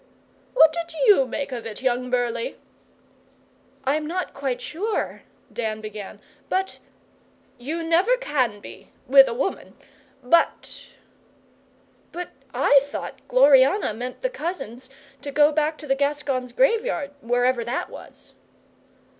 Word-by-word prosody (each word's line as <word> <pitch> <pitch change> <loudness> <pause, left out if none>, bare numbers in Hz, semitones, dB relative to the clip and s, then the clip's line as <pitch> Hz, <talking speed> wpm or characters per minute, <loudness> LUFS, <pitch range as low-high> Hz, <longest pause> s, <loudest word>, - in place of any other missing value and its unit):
'Eh? - - -34 0.2
What 320 -10 +7
did 335 0 -5
you 395 - +6
make 280 +3 -4
of 235 -3 -5
it, 220 +3 -8
young 250 0 0
Burleigh?' 240 -2 -1 1.3
'I'm 300 +3 0
not 365 +3 -3
quite 265 -3 -3
sure,' 370 - -3 0.3
Dan 220 -2 -3
began, 210 -2 -8 0.3
'but 380 +1 -1 0.4
' - - -35
'You 315 +7 -4
never 355 +10 +3
can 255 - -1
be - - -12 0.2
with 270 +1 +7
a - - -2
woman. 275 +10 -3 0.5
But 330 +7 +1 0.6
?' - - -35
'But 355 0 -6 0.2
I 275 +2 +5
thought 285 - -7
Gloriana 270 - +5
meant 250 - -7
the - - +1
cousins 265 - -6 0.3
to 285 - -6
go 295 +1 +5
back 305 +1 0
to 305 - -10
the 270 - +2
Gascons' 275 -3 -1
Graveyard, 460 - +1
wherever 245 0 +1
that 240 +3 -3
was. - - -13
275 Hz, 135 wpm, -24 LUFS, 245-330 Hz, 1.3 s, What